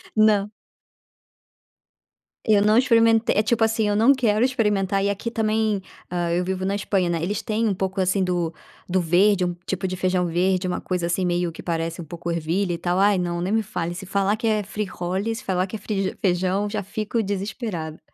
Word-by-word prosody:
Não. 210 -1 +3 1.9
Eu 215 -3 +4
não 210 +1 +4
experimente 230 -2 +4
É 210 - +3
tipo 235 0 +1
assim, 220 -1 +2
eu 205 - +1
não 230 +6 +6
quero 230 -4 +2
experimentar. 205 -6 +1
E 200 - +2
aqui 200 +3 -2
também, 220 -2 0 0.3
hã, 175 -1 -1
eu 175 +1 +1
vivo 190 0 -2
na 195 - 0
Espanha, 195 -2 0
né, 170 -2 -1
eles 195 +4 -2
têm 220 +1 0
um 200 - +1
pouco, 190 +1 -2
assim, 185 +1 +1
do 175 -2 -1 0.4
do 185 +1 +2
verde, 180 +3 +3
um 175 - -2
tipo 190 0 -2
de 185 - -3
feijão 185 0 +1
verde, 185 +2 +1
uma 180 - -2
coisa 180 -2 -2
assim, 175 +2 0
meio 175 0 0
que - - -10
parece 165 0 -2
um - - -6
pouco 170 +2 -6
ervilha 170 +3 -1
e - - -2
tal. 175 +2 -1
Ai, 200 0 +4
não, 175 -1 -2
nem 185 +4 -1
me 225 0 +2
fale. 175 -4 -4
Se 190 - -7
falar 195 +2 +1
que 220 - -5
é 215 -1 +1
frijoles, 200 +1 -3
se 260 - -9
falar 185 -1 +1
que 205 - -7
é - - -17 0.4
feijão 185 +2 +1
já 205 -1 -3
fico 215 +3 -2
desesperada. 195 -5 -4
195 Hz, 205 wpm, -23 LUFS, 180-215 Hz, 1.9 s, não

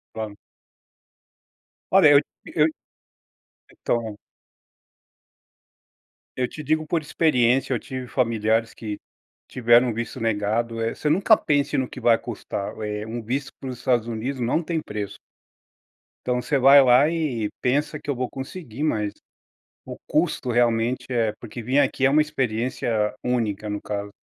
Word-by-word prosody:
Claro. 110 -2 -5 1.6
Olha 190 -5 +7
eu 145 - +8 0.3
eu, 150 -1 +2 1.0
então. 110 -3 -2 2.2
Eu 125 -1 0
te 155 - -8
digo 155 +2 0
por 165 +1 0
experiência, 135 -4 +2
eu 120 - 0
tive 130 +1 -7
familiares 115 -2 0
que 105 -2 -6 0.5
tiveram 120 0 +4
o - - -2
visto 115 +2 -5
negado, 115 +1 -1
eh, 115 0 -1
você 150 - -2
nunca 195 +7 +5
pense 145 -2 0
no 130 - 0
que - - -9
vai 115 -1 +5
custar, 100 -2 -5
eh, 105 0 -3
um 120 +2 -4
visto 135 +5 -3
para 135 - -7
os 125 - -6
Estados 120 -2 +1
Unidos 120 +4 -4
não 120 +7 +1
tem 165 -1 -2
preço. 105 -7 -6 1.1
Então, 125 0 +1
você 145 +3 0
vai 135 +2 +8
lá 130 +3 +6
e 150 -10 -1
pensa: 145 +4 0
"Que 145 - -10
eu 140 - +1
vou 125 0 -2
conseguir", 135 -1 -8
mas 105 -9 0 0.7
o - - -8
custo, 125 - 0
realmente, 120 +1 +1
é 115 -4 +1
porque 120 +1 -8
vir 130 +5 +2
aqui 135 -1 +2
é - - +4
uma 150 +2 +5
experiência 120 -6 -1
única 110 -4 -1
no 105 0 -4
caso. 100 -1 -4
125 Hz, 150 wpm, -24 LUFS, 115-140 Hz, 2.2 s, eu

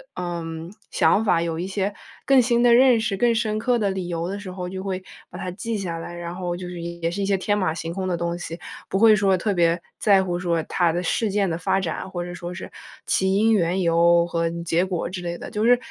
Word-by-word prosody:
嗯， 170 0 -5 0.2
想 215 - +3
法， 175 -5 +3
有 165 -1 -2
一 180 - -3
些 195 +1 -2 0.3
更 270 -2 +6
新 240 0 +2
的 240 -1 +6
认 255 0 +6
识， 200 -3 -1
更 235 +1 +3
深 215 -1 0
刻 245 +1 +2
的 205 -3 +1
理 185 -2 -4
由 170 0 -2
的 200 +1 -4
时 195 -2 -8
候 180 -1 -5
就 190 0 -5
会 190 -1 -4 0.3
把 - - -9
它 180 - -4
记 220 +4 -3
下 175 -4 -3
来， 175 +1 -7
然 175 0 -6
后 175 -2 -3
就 180 - -7
是 175 -1 -7
也 170 0 -3
是 200 - -3
一 - - +1
些 200 - +3
天 205 +2 0
马 185 -5 +1
行 165 0 -5
空 190 0 -3
的 180 - 0
东 170 0 -2
西， 165 -1 -6 0.3
不 - - -1
会 220 +1 +7
说 195 -2 +3
特 200 +3 -1
别 170 -1 +2 0.2
在 195 -3 +4
乎 175 -1 -2
说 170 -3 0
它 170 -1 +1
的 175 +1 -1
事 215 +5 0
件 200 -2 +1
的 165 - -2
发 175 +3 +1
展， 170 +2 -4
或 175 -2 -4
者 175 0 -7
说 175 0 -6
是 185 - -8 0.3
起 190 0 +2
因、 220 +2 +4
缘 185 -2 +2
由 170 0 +4
和 165 -1 -1
结 170 +2 +1
果 180 -2 -3
之 180 -1 -5
类 170 0 -4
的， - - -8
就 210 +2 0
是 245 +1 +6
180 Hz, 275 characters per minute, -23 LUFS, 170-205 Hz, 0.3 s, 会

